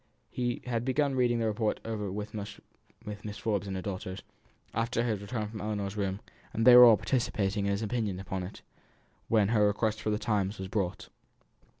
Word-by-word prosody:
He 120 -1 -2
had 120 -2 -1
been 135 +2 +1
reading 125 -2 +2
the 115 - 0
report 110 0 0
over 105 -3 -3
with 105 +2 -5
Mrs. 105 0 -9
Forbes 100 -3 -1
and 95 - -3
her 95 - -4
daughters, 95 -1 -5 0.5
after 115 +1 0
his 110 -4 -1
return 105 +1 -3
from 110 0 -7
Ellinor's 105 -2 -3
room, 100 -1 -2 0.3
and 115 - 0
they 125 -1 +10
were 125 0 +11
all 115 -3 +8
participating 100 -6 0
in - - +1
his 100 +2 -1
opinion 110 -4 -2
upon 95 -1 -4
it, 90 +3 -8 0.6
when 105 -3 +3
her 105 -2 +4
request 110 +1 0
for - - -1
the 105 - +1
Times 105 -2 -1
was 95 0 -6
brought. 95 -3 -2
105 Hz, 190 wpm, -30 LUFS, 100-115 Hz, 0.6 s, were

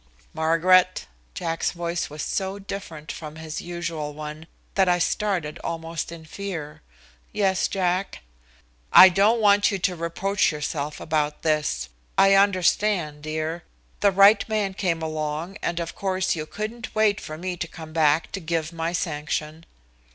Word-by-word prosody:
"Margaret." 175 +3 +3 0.3
Jack's 165 - -1
voice 170 0 -3
was 150 +1 -6
so 190 +1 -2
different 190 -6 -7
from 155 -1 -8
his 160 -1 -6
usual 165 -4 -4
one 155 +1 -7 0.3
that 190 -2 +3
I 175 - +4
started 175 -4 -1
almost 165 0 -4
in 165 -1 -10
fear. 165 -4 -6 0.5
"Yes, 190 -2 +1
Jack." 185 - -1 0.7
"I 190 - +10
don't 205 +6 +3
want 205 -1 +5
you 200 - -1
to 185 -1 0
reproach 180 +5 0
yourself 150 -1 -4
about 150 -1 -1
this. 155 - 0 0.3
I 195 0 +6
understand, 190 -4 +2
dear. 155 +2 -3 0.4
The 205 - +5
right 200 +2 +6
man 210 -3 0
came 175 -4 -1
along, 155 +4 -3
and 170 0 -1
of 170 -1 -4
course 190 -2 -1
you 155 -1 -5
couldn't 220 +5 -6
wait 215 -1 +3
for 155 - -7
me 180 +2 -4
to 170 - -3
come 160 -1 -10
back 155 0 +2
to 195 - -4
give 165 -1 -2
my 165 +1 -2
sanction." 155 0 -3
170 Hz, 150 wpm, -24 LUFS, 155-195 Hz, 0.7 s, I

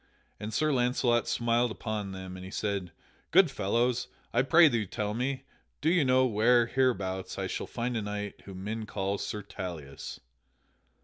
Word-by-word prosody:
And 105 +1 -5
Sir 155 +7 +2
Launcelot 125 -1 +2
smiled 120 +1 +2
upon 110 -3 -4
them, 95 -1 -7
and 95 - -8
he 95 - -7
said: 100 -3 -2 0.4
"Good 180 -7 +6
fellows, 120 +3 +1 0.3
I 120 - +4
pray 160 +5 +7
you 115 -7 0
tell 105 +1 -2
me; 130 +4 -2 0.4
do 155 +3 +2
you 175 -3 +4
know 130 0 +4
where, 120 +1 +4
hereabouts, 100 -7 0
I - - -1
shall - - -3
find 120 +1 -2
a 115 - 0
knight 105 0 -5
whom 95 -1 -8
men 110 +1 -4
call 100 0 -2
Sir 105 -1 -4
Tauleas?" 85 -8 -7
110 Hz, 170 wpm, -30 LUFS, 100-125 Hz, 0.4 s, pray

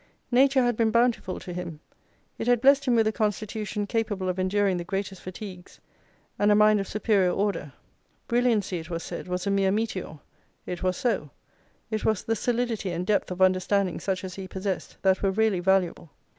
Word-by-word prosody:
Nature 265 +1 +4
had 240 -1 +1
been 225 0 +2
bountiful 235 -4 +1
to 180 - -7
him; 170 -3 -6 0.6
it 225 - -3
had 245 -1 +4
blessed 275 +2 +5
him 250 -3 +3
with 225 -1 +4
a 215 - +2
constitution 210 -1 -2
capable 205 -4 -1
of 185 +1 -2
enduring 190 0 +1
the 175 - -3
greatest 195 +1 -4
fatigues; 185 -1 -9 0.6
and 205 0 +4
a - - +6
mind 210 0 +5
of 195 - -3
superior 205 -3 +2
order. 195 -6 -1 0.6
Brilliancy, 230 -7 +1
it 165 +1 -10
was 170 -1 -4
said, - - -6
was 180 +1 -3
a 200 - +1
mere 195 -1 +2
meteor; 200 -6 -2 0.5
it 180 - -5
was 185 -1 0
so: 240 -2 -1 0.6
it 215 -1 -2
was 220 -3 +1
the 225 - 0
solidity 235 -3 -1
and 175 +1 -3
depth 205 +1 +1
of 180 +1 +1
understanding 185 0 +2
such 190 -1 -2
as 185 -1 -6
he 190 0 -7
possessed, 190 0 -4
that 190 -1 +3
were 195 - +2
really 210 -1 +1
valuable. 180 -3 +1
200 Hz, 190 wpm, -26 LUFS, 185-220 Hz, 0.6 s, a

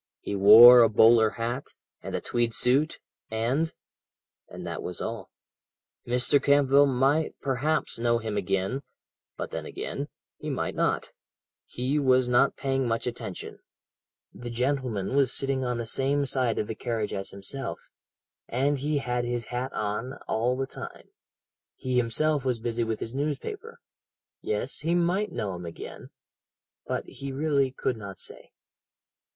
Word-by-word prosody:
He 100 - -4
wore 115 +5 +10
a 115 - +6
bowler 110 +1 +6
hat, 120 +5 -4 0.3
and - - -5
a - - -2
tweed 120 -2 -1
suit 140 +6 +2 0.3
and 125 +9 0 0.8
and - - -8
that - - -4
was - - -5
all - - -5 0.8
Mr. 125 +3 +2
Campbell 140 0 +5
might 140 +4 +1
perhaps 140 0 0
know 120 0 +2
him 110 -2 -4
again, 95 +6 -1 0.6
but - - -5
then - - -5
again, - - -5 0.3
he - - -5
might - - -2
not - - 0 0.6
he 130 +4 -1
was 130 -2 +3
not 125 +3 +3
paying 135 -2 -1
much 115 0 -1
attention 115 -6 -6 0.7
the 120 0 -8
gentleman 125 -3 -1
was 140 -2 +3
sitting 135 -1 -1
on 125 -1 -1
the 115 - -3
same 140 +4 0
side 130 -3 0
of - - 0
the 110 - -4
carriage 110 -2 -3
as 95 -1 -2
himself 100 0 -4 0.7
and 135 +3 0
he 150 +2 0
had 125 -3 -1
his 120 -1 -2
hat 130 +2 -2
on 105 +5 -3
all 120 +3 0
the 135 - -1
time. - - -10 0.7
He 130 -1 -2
himself 140 +5 +2
was 125 -3 0
busy 115 +1 -2
with 110 -1 -3
his 115 - -5
newspaper 145 0 -4 0.6
yes 105 +5 -2
he 165 +3 0
might 180 +4 +1
know 100 -3 -3
him 90 -1 -7
again 85 - -9 0.8
but - - -2
he 140 0 -7
really 140 -1 +1
could 125 -2 -2
not 100 -3 -8
say. - - -8
125 Hz, 150 wpm, -27 LUFS, 115-135 Hz, 0.8 s, wore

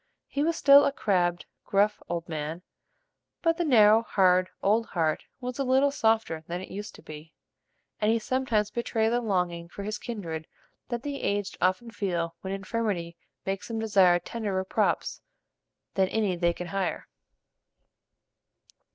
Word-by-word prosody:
He 280 - -3
was 330 +2 +1
still 280 -2 +7
a - - +2
crabbed, 175 -8 0 0.2
gruff, 205 +2 +1
old 170 -1 -3
man; 160 +2 -4 0.8
but 330 -1 +2
the 350 - +1
narrow, 220 -7 +6
hard, 185 -4 +3
old 220 +3 +2
heart 160 -3 -1
was 250 +1 -5
a - - +2
little 265 +2 +3
softer 220 - +1
than 175 +1 -3
it 190 - -9
used 205 +2 -7
to - - -15
be; 155 +1 -11 0.7
and 210 - +2
he 230 - +3
sometimes 225 -3 0
betrayed 225 -2 0
the 240 +1 +1
longing 180 -5 -1
for 200 - -7
his 210 +1 -4
kindred 165 -9 -5 0.4
that 240 -1 -3
the 285 -1 -4
aged 200 0 -1
often 185 +6 +1
feel 170 -5 -2
when 190 - -5
infirmity 195 -4 -2 0.3
makes 195 -1 -3
them 230 - -4
desire 195 -5 +4
tenderer 195 +1 -3
props 190 - 0 0.7
than 190 -1 +2
any 205 -2 0
they 170 0 +1
can 180 - -6
hire. 195 -1 -2
200 Hz, 155 wpm, -27 LUFS, 175-230 Hz, 0.8 s, still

